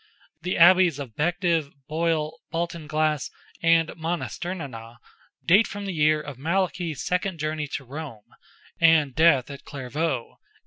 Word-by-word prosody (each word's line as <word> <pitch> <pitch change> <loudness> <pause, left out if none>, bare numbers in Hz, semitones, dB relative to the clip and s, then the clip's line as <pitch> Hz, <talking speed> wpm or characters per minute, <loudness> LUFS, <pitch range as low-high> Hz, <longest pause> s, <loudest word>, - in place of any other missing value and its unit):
The 180 +2 -2
Abbeys 175 -2 +6
of 135 -6 -8
Bective, 170 -1 0 0.2
Boyle, 160 -1 -1
Baltinglass, 155 -3 -1 0.3
and 165 -1 +4
Monasternenagh, 160 -7 -5 0.5
date 195 +6 +5
from 205 0 -6
the 195 - -3
year 155 -1 +3
of 145 -4 -8
Malachy's 170 0 -1
second 180 0 -1
journey 155 0 -2
to - - -5
Rome, 135 -5 -8 0.5
and 160 -5 +4
death 145 -3 +4
at 140 0 -10
Clairvaux—A. 140 -1 -3
160 Hz, 125 wpm, -25 LUFS, 145-170 Hz, 0.5 s, Abbeys